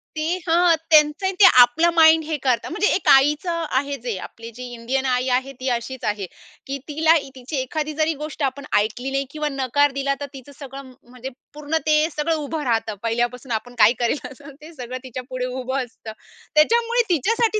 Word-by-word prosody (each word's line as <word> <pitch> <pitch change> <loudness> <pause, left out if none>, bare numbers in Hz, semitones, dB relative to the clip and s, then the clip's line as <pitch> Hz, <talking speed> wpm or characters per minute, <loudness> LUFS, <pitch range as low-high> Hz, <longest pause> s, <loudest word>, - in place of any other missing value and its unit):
ते 310 - -2 0.2
हं, 340 +1 +4
त्यांचं 310 +4 +4
ते 405 - +8 0.2
आपलं 245 +8 +4
माइंड 320 -1 +6
हे 310 0 -3
करतात. 250 -4 -1
म्हणजे 360 +5 +1
एक 375 - -4
आईचं 300 +5 +3
आहे, 280 +1 -1
जे 235 -5 -4
आपली 230 0 -10
जी 250 - -8
इंडियन 250 +3 -2
आई 255 0 0
आहे 265 +1 -5
ती 260 +1 -2
अशीच 245 +2 -7
आहे, 205 -2 -2 0.4
की 275 +1 -3
तिला 315 +2 +3 0.2
तिची 260 +4 -7
एखादी 305 +4 -3
जरी 310 +1 0
गोष्ट 305 -1 -5
आपण 275 +1 -2
ऐकली 230 +6 -1
नाही 275 0 -1
किंवा 300 -1 -3
नकार 275 +2 +1
दिला 275 +1 -1
तर 285 - -4
तिचं 270 +1 -12
सगळं 270 -1 -9 0.2
म्हणजे 250 +1 -8 0.2
पूर्ण 300 +2 -2
ते 310 -1 +3 0.2
सगळं 310 +2 0
उभं 305 0 -4
राहतं 225 -4 -1
पहिल्यापासून. 240 +2 -2
आपण 240 +2 -4
काय 225 +1 +6
करेल 240 +4 +1
असं 280 +2 -13
ते 315 +3 -12
सगळं 255 -3 -7
तिच्या 255 -1 -7
पुढे 255 -1 -3
उभं 260 +1 -3
असतं. 230 -2 -11 0.4
त्याच्यामुळे 465 +9 +3
तिच्यासाठी 430 - +1
275 Hz, 190 wpm, -22 LUFS, 250-310 Hz, 0.4 s, ते